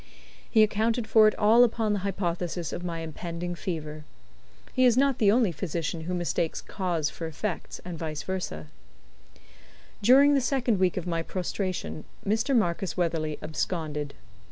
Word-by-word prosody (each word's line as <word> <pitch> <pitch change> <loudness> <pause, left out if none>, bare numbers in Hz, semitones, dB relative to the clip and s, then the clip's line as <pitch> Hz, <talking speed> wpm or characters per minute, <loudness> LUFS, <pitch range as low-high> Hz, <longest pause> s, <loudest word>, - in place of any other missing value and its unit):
He 220 -2 +6
accounted 220 +2 +1
for 220 0 +6
it 215 - +1
all 220 +3 +6
upon 225 -3 +1
the 205 - 0
hypothesis 175 -3 -2
of 175 - -5
my 170 -2 -3
impending 170 +2 -5
fever. 155 -4 -5 0.7
He 255 - +2
is 245 -1 +5
not 275 -1 +3
the 205 -3 +5
only 225 -4 +3
physician 165 0 -3
who 180 +1 -2
mistakes 170 -2 -1
cause 175 -6 -2
for 165 - -5
effect, 165 +4 -4
and 175 -3 -6
vice 155 -2 -4
versa. 180 - -4 1.4
During 275 +6 +6
the 275 - +3
second 245 -5 +1
week 185 -1 +2
of 180 - -2
my 165 -2 -1
prostration, 185 -2 -4 0.2
Mr. 220 +7 +1
Marcus 180 -2 0
Weatherley 160 -3 -1
absconded. 155 -3 -3
180 Hz, 155 wpm, -27 LUFS, 165-215 Hz, 1.4 s, He